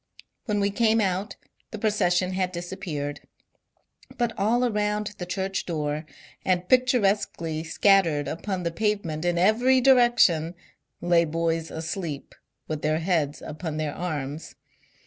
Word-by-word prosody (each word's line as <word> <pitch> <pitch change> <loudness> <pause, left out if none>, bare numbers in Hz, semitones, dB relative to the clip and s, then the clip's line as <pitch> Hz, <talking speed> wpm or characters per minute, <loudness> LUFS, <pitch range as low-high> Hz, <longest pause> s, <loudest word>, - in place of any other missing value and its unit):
When 210 -3 0
we 200 0 +1
came 225 +1 +3
out 195 0 -1 0.3
the 220 - -6
procession 185 -4 +1
had 185 -1 -1
disappeared, 175 -5 -5 1.0
but 240 -2 0
all 235 +5 +2
around 210 -2 -1
the 180 - -5
church 190 +1 -3
door, 155 -2 -2 0.4
and 180 -1 0
pictur 250 -2 +4
esquely 165 -5 -1
scattered 165 -3 +3
upon 185 +2 -3
the 170 - -1
pavement 175 -5 -1
in 175 -1 +1
every 235 +8 +4
direction, 240 -11 +4 0.5
lay 175 -1 +4
boys 165 0 -1
asleep, 160 -2 -5 0.3
with 155 -1 -4
their 155 +1 +1
heads 160 -4 -1
upon 155 0 -5
their 155 -2 -2
arms. 155 -3 -5
180 Hz, 130 wpm, -25 LUFS, 160-210 Hz, 1.0 s, pictur